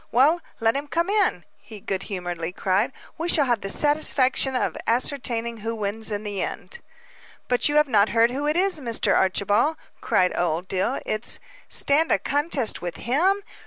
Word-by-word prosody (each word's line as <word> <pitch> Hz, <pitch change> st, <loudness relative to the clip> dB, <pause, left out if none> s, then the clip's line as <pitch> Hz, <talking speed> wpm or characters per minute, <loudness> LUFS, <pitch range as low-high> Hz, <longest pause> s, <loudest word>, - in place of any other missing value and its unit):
Well, 295 Hz, +8 st, +3 dB, 0.2 s
let 225 Hz, +1 st, +2 dB
him 285 Hz, +1 st, -3 dB
come 340 Hz, +5 st, -1 dB
on," 390 Hz, -, +1 dB
he 215 Hz, -, -11 dB
good 195 Hz, -1 st, -3 dB
humoredly 175 Hz, -3 st, -4 dB
cried. 195 Hz, +7 st, 0 dB, 0.3 s
"We 335 Hz, +2 st, -2 dB
shall 295 Hz, -4 st, +3 dB
have 240 Hz, -4 st, 0 dB
the 195 Hz, -, -5 dB
satisfaction 270 Hz, -2 st, +3 dB
of -, -, -1 dB
ascertaining 235 Hz, -2 st, 0 dB
who 225 Hz, +2 st, -4 dB
wins 215 Hz, +1 st, -3 dB
in 205 Hz, 0 st, -3 dB
the 205 Hz, -2 st, -4 dB
end." 475 Hz, -, -6 dB, 0.7 s
"But 250 Hz, +3 st, +2 dB
you 295 Hz, -, -1 dB
have 300 Hz, 0 st, +4 dB
not 215 Hz, -4 st, +3 dB
heard 230 Hz, +1 st, +3 dB
who 285 Hz, +3 st, -3 dB
it 305 Hz, +3 st, +1 dB
is, 375 Hz, -3 st, +1 dB
Mr. 235 Hz, -5 st, +1 dB
Archibald," 205 Hz, -, +1 dB, 0.2 s
cried 180 Hz, 0 st, +1 dB
Old 175 Hz, +1 st, -1 dB
Dill, 185 Hz, 0 st, -1 dB
"It 215 Hz, +2 st, -1 dB, 0.2 s
" -, -, -25 dB
"Stand 305 Hz, +3 st, +2 dB
a -, -, +4 dB
contest 285 Hz, -4 st, -1 dB
with 175 Hz, -2 st, -5 dB
him?" 365 Hz, -, +1 dB
235 Hz, 180 wpm, -24 LUFS, 205-295 Hz, 0.7 s, have